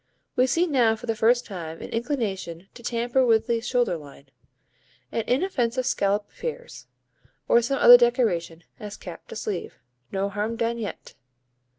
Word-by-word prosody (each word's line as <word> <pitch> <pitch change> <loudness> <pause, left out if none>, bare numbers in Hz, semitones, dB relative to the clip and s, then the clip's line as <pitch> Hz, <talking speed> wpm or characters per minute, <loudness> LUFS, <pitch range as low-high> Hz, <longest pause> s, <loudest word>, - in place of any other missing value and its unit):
We 255 +1 +3
see 335 +7 +2
now 245 -9 +3
for 220 - -10
the 225 -1 -1
first 240 +3 +3
time 165 -5 -7
an - - -8
inclination 205 - -3
to 240 - -13
tamper 240 +2 0
with 225 -3 +3
the 235 -2 0
shoulder 240 -6 0
line. 140 -2 -14 0.8
An 230 - -1
inoffensive 255 -4 0
scallop 205 -3 0
appears, - - -7 0.6
or 235 - +5
some 275 +4 -1
other 245 -1 +10
decoration, 205 -9 +1 0.2
as 210 -1 -7
cap 175 -2 -10
to - - -9
sleeve. 210 -4 -4 0.4
No 195 0 -1
harm 210 +3 -2
done 230 +1 -1
yet! 210 -3 -6
230 Hz, 160 wpm, -25 LUFS, 200-245 Hz, 0.8 s, other